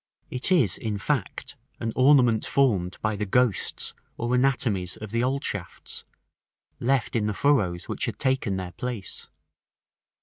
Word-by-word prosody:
§ - - -39
VI. - - -6
It 125 +8 0
is, 130 - +4
in 110 -2 -2
fact, 130 +1 -2 0.2
an 115 - -2
ornament 130 -4 +5
formed 100 -10 +1
by 110 -1 +1
the 105 0 -3
ghosts 120 0 +1 0.2
or 120 +1 -1
anatomies 125 -8 +1
of 110 -1 -8
the 115 +1 +1
old 135 +2 0
shafts, 100 -4 -5 0.7
left 130 -1 +1
in 105 -2 +1
the 105 - -1
furrows 100 -12 +2
which - - -2
had - - -4
taken 130 -7 +1
their 90 -1 -5
place. 120 -3 -5
115 Hz, 160 wpm, -26 LUFS, 100-130 Hz, 0.7 s, ornament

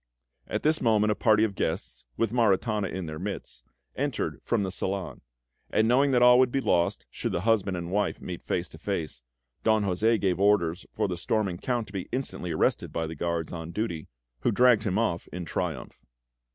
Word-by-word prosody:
At - - -3
this 155 +1 +2
moment 110 -3 +3
a - - +1
party 110 -1 +4
of 110 -3 +1
guests, 85 -1 -3
with 115 -1 0
Maritana 105 -2 +2
in 95 0 -4
their 75 -1 -6
midst, 90 -10 -6 0.3
entered - - -2
from 115 -4 +1
the 95 - -2
salon; 95 +1 -3 0.5
and 110 - +2
knowing 135 +4 +4
that 125 -2 +4
all 125 0 +8
would 130 -1 +4
be 135 - +1
lost 85 -9 +1
should - - -3
the 85 - -1
husband 100 -3 +1
and 85 0 -5
wife 105 0 0
meet 90 -2 -6
face - - -2
to - - -13
face, 75 -6 -3 0.4
Don 110 -1 +3
José 110 +4 +2
gave 95 -2 0
orders 100 -4 +2
for - - -1
the 90 -2 -3
storming 95 -1 -1
Count 120 -3 -1
to 100 - -15
be 95 -2 -4
instantly 130 -8 -3
arrested - - +1
by 80 - -2
the 80 - -5
guards 85 +1 -2
on 80 -1 -6
duty, 85 -5 -3 0.3
who 120 - +1
dragged 120 -1 +4
him 100 -1 0
off 110 -7 0
in 90 0 -5
triumph. - - -4
100 Hz, 200 wpm, -27 LUFS, 85-115 Hz, 0.5 s, all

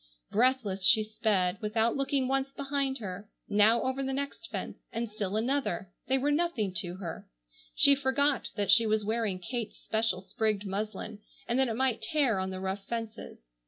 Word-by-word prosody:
Breathless 225 -5 +1
she 220 +2 +7
sped, 205 -4 0
without 220 +2 +1
looking 275 -1 0
once 270 +1 0
behind 275 -1 -1
her, 200 -2 -7 0.2
now 210 +3 +4
over 260 +1 -1
the 270 0 -2
next 280 +5 -4
fence - - -5
and 235 +1 -2
still 210 -1 -3
another. 235 -5 -1 0.2
They 265 - +3
were 285 +2 +1
nothing 290 - 0
to 175 +1 -4
her. 175 -4 -7 0.5
She 280 - +6
forgot 280 0 +1
that 205 -2 +1
she 230 -1 +6
was 215 -1 +1
wearing 220 -3 0
Kate's 225 +5 -5
special 220 -4 -1
sprigged 215 0 -1
muslin, 210 +2 -4 0.3
and 240 +2 +1
that 265 - +4
it 225 - -2
might 255 -1 +1
tear 275 -10 +1
on 190 0 -2
the 185 0 -5
rough 190 +1 -3
fences. 225 - -6
225 Hz, 175 wpm, -30 LUFS, 205-265 Hz, 0.5 s, she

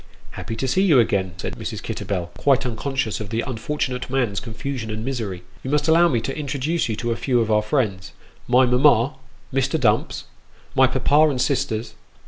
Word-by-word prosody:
" - - -32
Happy 115 - -6
to 130 - -2
see 185 +9 +2
you 175 -8 +5
again," 95 -5 +1
said - - -5
Mrs. - - -5
Kitterbell, 90 -3 -4
quite 135 -1 +2
unconscious 125 -1 -2
of 105 -2 -6
the 115 +2 -1
unfortunate 130 +1 -3
man's 125 -6 0
confusion 120 +1 -5
and 110 +1 -4
misery; 110 -9 -4
" - - -26
you 130 - -4
must 150 +1 +1
allow 165 +2 +5
mo 140 -8 +1
to 125 +4 -3
introduce 150 +1 -1
you 110 - -1
to 120 +2 -2
a - - 0
few 125 0 +1
of 110 -1 0
our 105 0 +4
friends: 105 -5 -1 0.4
my 125 +1 +5
mamma, 125 0 +4 0.4
Mr. 135 +4 +1
Dumps 110 -4 +1 0.5
my - - +5
papa 155 +2 +3
and 135 -3 -2
sisters." 125 -4 -1
125 Hz, 195 wpm, -22 LUFS, 110-140 Hz, 0.5 s, you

